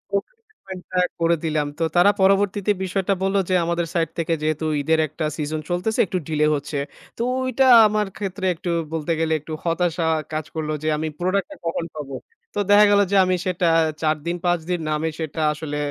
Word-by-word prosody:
ও - - +5
পেমেন্টটা 195 - -8 0.2
করে 170 0 +3
দিলাম। 155 -2 0
তো - - +1
তারা 180 +4 +6
পরবর্তীতে 195 +1 +3
বিষয়টা 190 +1 0
বলল 195 +1 0
যে, - - +1
"আমাদের 170 0 0
সাইড 165 -2 0
থেকে 165 0 0
যেহেতু 155 0 -1 0.2
ঈদের 160 +2 +2
একটা 155 +2 -4
সিজন 155 +1 -3
চলতেছে, 180 +5 -1
একটু 185 - -2
ডিলে 150 -1 +1
হচ্ছে।" 145 +1 -4 0.4
তো - - -4 0.2
ওইটা 260 +1 +2 0.2
আমার 210 -1 0
ক্ষেত্রে 195 -1 -4
একটু 175 +1 -5 0.2
বলতে 160 +1 -2
গেলে 160 -1 +1
একটু 155 +2 -8
হতাশা 170 0 0 0.3
কাজ 155 0 -2
করলো 155 -1 -2
যে, 155 - -2
"আমি 155 +1 -2
প্রোডাক্ট 185 +2 0
টা - - -8
কখন 165 0 -2
পাবো?" 140 -3 -6 0.4
তো - - -1
দেখা 210 +1 +8
গেল 205 0 +5
যে 200 - +2
আমি 185 0 +1
সেটা 180 -1 0 0.3
৪ 155 0 +2
দিন, 170 +1 -1
৫ 175 -1 +2
দিন 175 -1 0
না। 155 - -2
আমি 160 +1 -1
সেটা 160 0 -4
আসলে 150 -1 -5
170 Hz, 195 wpm, -22 LUFS, 155-190 Hz, 0.4 s, দেখা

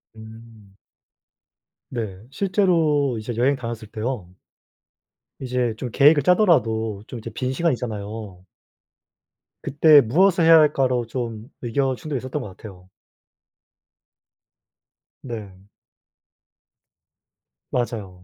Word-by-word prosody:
음. 110 -2 -14 1.1
네. 105 -6 -5
실제로 160 - +1
이제 110 +1 -5
여행 135 +4 +2
다녔을 115 -4 -7
때요 110 -6 -5 1.1
이제 125 -3 -1
좀 125 - -5
계획을 145 +3 +5
짜더라도 115 - +2
좀 120 - -7
이제 115 +1 -8
빈 130 +3 -2
시간이 165 +2 +1
있잖아요. 105 -5 -6 1.2
그때 145 +1 +5
무엇을 170 - +3
해야 165 -1 +8
할까로 130 -5 +2
좀 115 -1 -5
의견 130 +2 -1
충돌이 145 +1 -5
있었던 130 +4 -5
것 105 - -7
같아요. 95 -4 -13 2.3
네. 100 -6 -9 2.1
맞아요. 105 -7 -4
120 Hz, 205 characters per minute, -22 LUFS, 110-140 Hz, 2.3 s, 해야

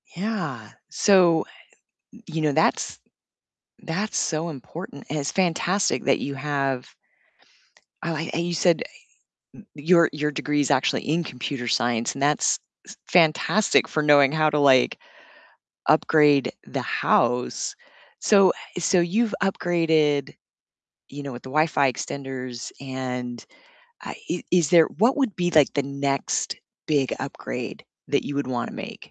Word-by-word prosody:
Yeah, 175 - -4 0.2
so, 180 -5 +4 0.7
y 230 - -16
you 160 -2 -3
know, 150 -1 +2
that's - - +1 0.8
that's 200 +7 -3
so 160 +1 -1
important, 150 +2 -9
and 155 - -1
it's 140 -1 -3
fantastic 185 +2 0
that - - +2
you 140 - -4
have 135 -2 -3 1.1
I 170 - -2
like 160 +1 -3
and 170 +1 -1
you 175 - -2
said 170 0 +2 0.7
n 220 -2 -15
your 170 +3 +4
your 150 0 -1
degree's 145 -1 -1
actually 135 -2 +2
in 165 +3 -1
computer 125 -1 -5
science, 120 0 0
and 140 - -6
that's 145 +1 +2 0.3
s - - -12
fantastic 175 +5 +3
for 155 - -1
knowing 145 -2 +6
how 155 -1 +2
to, 150 - 0
like, 130 -3 +4 0.9
upgrade 150 -3 +4
the - - -4
house, 125 +1 0 0.4
so 195 -3 +5 0.3
so 180 +2 +2
you've 210 +7 +1
upgraded, 160 -7 +1 0.7
you 145 +1 -8
know, 140 -2 -6
with 120 - -9
the 130 - -8
Wi-Fi 155 -2 +2
extenders, 130 -1 -6
and, 125 -2 -5 0.6
uh, - - -5 0.2
i 180 - -2
is 175 -5 +3
there 170 -2 +7
What 235 +6 +3
would 265 -8 0
be, 175 -1 -1
like, 150 -3 +4
the 145 - 0
next 140 0 -2 0.3
big 140 -4 +1
upgrade - - -6 0.2
that - - +1
you 145 - -4
would 140 -2 -2
wanna 120 -2 -3
make? - - -7
150 Hz, 140 wpm, -24 LUFS, 135-170 Hz, 1.1 s, there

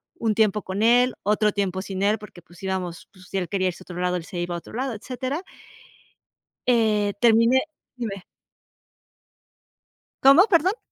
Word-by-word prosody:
un 220 -2 -1
tiempo 210 -1 +2
con 190 +3 -3
él, 245 +2 +4
otro 210 +1 +2
tiempo 190 -2 -1
sin 195 0 -4
él 210 +2 +2
porque 210 -4 -13
pues 175 +1 -18
íbamos 185 -3 -4
pues 185 -2 -17
si 195 - -3
él 180 -2 -1
quería 185 0 0
irse 180 - -9
a - - -32
otro 175 0 -6
lado, 180 0 0
él 170 - -7
se 180 - -8
iba 175 0 -3
a - - -2
otro 170 - -12
lado, 255 +2 -2
etcétera. 255 +7 -4 1.3
Eh, 215 -4 +2
terminé 230 +2 +5 0.3
dime. 205 -7 -5 2.0
¿Cómo? 275 +8 +7
Perdón. 370 +2 +3
210 Hz, 170 wpm, -24 LUFS, 185-240 Hz, 2.0 s, Cómo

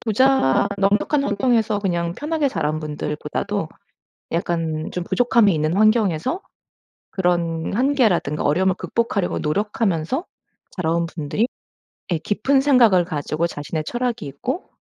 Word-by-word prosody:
부자 225 - +3
넉넉한 210 +9 +2
환경에서 215 -1 +1
그냥 170 -3 -1
편하게 300 - -1
자란 155 - -1
분들보다도 150 +4 -3 0.6
약간 165 -2 -2
좀 180 - -3
부족함이 235 -3 +3
있는 155 +3 0
환경에서 215 - +2 0.7
그런 170 -3 0
한계라든가 225 - +1
어려움을 185 +5 +2
극복하려고 210 -3 -1
노력하면서 205 - -1 0.5
자라온 170 -1 0
분들이 165 +8 -1 0.6
예 170 - +2
깊은 220 - +1
생각을 235 -11 +5
가지고 155 0 -2
자신의 155 0 -4
철학이 240 -1 -2
있고 250 - -5
190 Hz, 315 characters per minute, -21 LUFS, 160-235 Hz, 0.7 s, 생각을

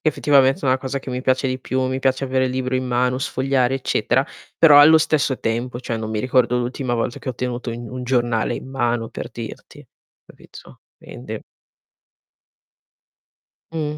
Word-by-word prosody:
effettivamente 140 -3 +3
è - - +2
una 130 +1 +3
cosa 135 +1 -4
che 135 - -8
mi 125 0 -3
piace 130 +1 +1
di 130 0 -2
più, 130 0 -2
mi 130 0 -1
piace 130 0 +1
avere 130 0 +1
il - - -2
libro 130 0 -2
in 130 0 -1
mano, 125 +1 +1
sfogliare, 130 -1 0
eccetera, 130 0 0 0.3
però 150 -3 +8
allo 160 +2 +8
stesso 145 -4 +1
tempo, 120 +2 -2
cioè, 120 -3 -3
non 110 0 -5
mi 110 -1 -2
ricordo 125 0 +2
l'ultima 125 +1 -2
volta 120 +1 -2
che - - -8
ho 130 - -3
tenuto 125 0 -4
in 120 0 -7
un 125 0 -6
giornale 120 -3 0
in - - -8
mano, 120 -3 -1
per - - -7
dirti. 115 -1 -10 0.4
Capito? - - -16 0.2
Quindi - - -8 2.3
Mh. 150 -2 -3
130 Hz, 175 wpm, -21 LUFS, 120-135 Hz, 2.3 s, però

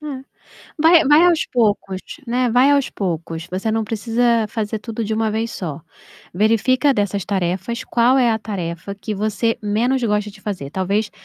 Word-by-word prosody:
É. 285 -4 -6 0.6
Vai 325 +1 +6
vai 300 +4 +6
aos 345 -3 +3
poucos, 205 -5 0 0.3
né, 245 +1 +1
vai 250 +4 +4
aos 280 -2 +2
poucos. 165 -3 -4
Você 190 +4 -2
não 225 0 0
precisa 230 +2 +1
fazer 215 0 -3
tudo 230 +1 -5
de 220 0 -2
uma 220 0 0
vez 225 +2 -2
só. 165 -4 -5 0.5
Verifica 230 +7 +3
dessas 200 -4 -1
tarefas 195 +6 -2
qual 250 +1 +2
é 245 -3 +3
a 220 - 0
tarefa 190 -3 -5
que 205 +2 -5
você 215 +3 -1
menos 235 +5 0
gosta 210 -2 0
de 200 -1 -16
fazer. 185 -10 -5
Talvez 200 +5 -1
220 Hz, 170 wpm, -20 LUFS, 200-245 Hz, 0.6 s, Vai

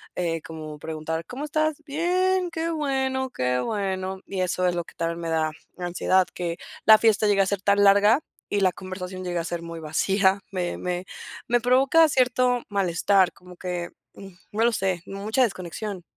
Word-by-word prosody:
eh, 165 -2 -1
como 155 -2 -8
preguntar: 160 +1 -4
"¿Cómo 270 - -6
estás? 310 0 0
'Bien'. 360 +4 +1
Qué 330 0 -2
bueno, 265 -4 -1
qué 125 - 0
bueno". 190 - -2
Y 190 -1 -3
eso 185 0 0
es 175 - 0
lo 175 - -1
que - - -17
también 170 0 -2
me 165 - -3
da 160 -1 +1 0.3
ansiedad, 180 +1 +1
que 170 -1 -3 0.3
la 220 - +9
fiesta 215 -1 +3
llegue 205 -1 +3
a - - +3
ser 195 0 -2
tan 200 +1 +3
larga 205 +5 +6 0.3
y 205 - +1
la 185 -1 +4
conversación 185 0 -7
llegue 175 -1 -2
a 165 - -2
ser 170 0 -4
muy 165 0 -7
vacía. 190 +5 +2
Me 180 -2 -2
me 180 0 -3 0.4
me 240 0 +3
provoca 265 +7 +5
cierto 250 -2 +2
malestar, 190 -1 +2
como 180 0 -15
que, 175 -1 -4 0.2
mm, 195 - -11 0.3
no 220 +2 +1
lo 240 - +4
sé, 190 -5 -1
mucha 205 +6 -1
desconexión. 195 -1 -4
190 Hz, 180 wpm, -25 LUFS, 175-240 Hz, 0.4 s, la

